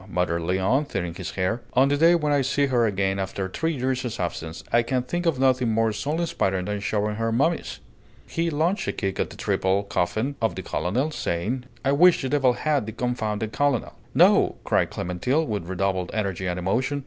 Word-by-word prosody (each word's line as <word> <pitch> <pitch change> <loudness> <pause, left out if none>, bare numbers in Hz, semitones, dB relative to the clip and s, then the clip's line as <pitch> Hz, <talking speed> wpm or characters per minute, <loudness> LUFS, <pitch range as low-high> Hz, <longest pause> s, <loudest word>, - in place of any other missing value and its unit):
muttered 85 -1 0
Léon, 95 - +1
tearing 90 -8 -3
his 90 0 -6
hair. 100 +6 0
"On 130 +2 +5
the 145 - +2
day 165 +4 +5
when 150 -3 +1
I 140 - +3
see 140 +2 +1
her 120 -4 +2
again 95 -1 0
after 95 0 -3
three 160 - -2
years' 125 -2 -2
absence, 85 -2 -4
I 120 - +6
can 125 +1 -1
think 175 +7 -2
of 160 -5 +2
nothing 130 -2 +3
more 110 0 +2
soul 150 +9 -2
inspiring 95 - 0
than 105 +1 -2
showing 105 +1 -1
her 115 0 0
mummies!" 150 +8 0 0.5
He 170 0 -1
launched 165 +6 0
a - - 0
kick 95 -2 -3
at - - 0
the - - -11
triple 95 +2 +1
coffin 110 +8 -1
of 115 - +1
the 95 - -5
colonel, 100 - -1
saying, 120 - -2 0.2
"I 135 - +3
wish 170 +2 +5
the 130 - -1
devil 135 -3 +3
had 145 -3 0
the 110 - -5
confounded 110 -3 -2
colonel!" 145 -5 0 0.2
"No!" - - +5
cried - - +1
Clémentine, 110 - -1
with 105 - -3
redoubled 95 -1 -1
energy 95 -3 -2
and 90 0 -2
emotion. 125 +10 0
115 Hz, 200 wpm, -24 LUFS, 95-140 Hz, 0.5 s, I